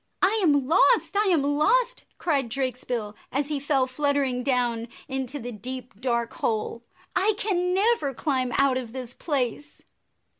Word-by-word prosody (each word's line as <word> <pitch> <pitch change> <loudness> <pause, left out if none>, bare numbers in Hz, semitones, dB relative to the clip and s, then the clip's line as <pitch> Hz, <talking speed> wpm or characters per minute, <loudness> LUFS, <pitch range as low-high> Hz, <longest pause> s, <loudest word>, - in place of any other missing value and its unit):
"I 415 +4 +4
am 285 -7 +3
lost! 380 - +4
I 415 +1 +3
am 335 -7 +3
lost!" 385 - +2
cried 280 -8 0
Drakesbill, 245 -4 -2 0.2
as 280 +2 -1
he 295 -2 -1
fell 275 -2 +2
fluttering 270 -1 0
down 245 -3 0 0.2
into 265 +1 -3
the 245 -2 -6
deep, 250 +3 -6
dark 235 -2 0
hole. 225 +1 -2 0.2
" 365 - -27
I 410 +4 +3
can 360 -4 0
never 395 -8 +2
climb 255 -3 0
out 275 -2 +4
of 240 -3 -5
this 250 -2 -5
place 285 -1 -3
275 Hz, 155 wpm, -26 LUFS, 250-315 Hz, 0.2 s, I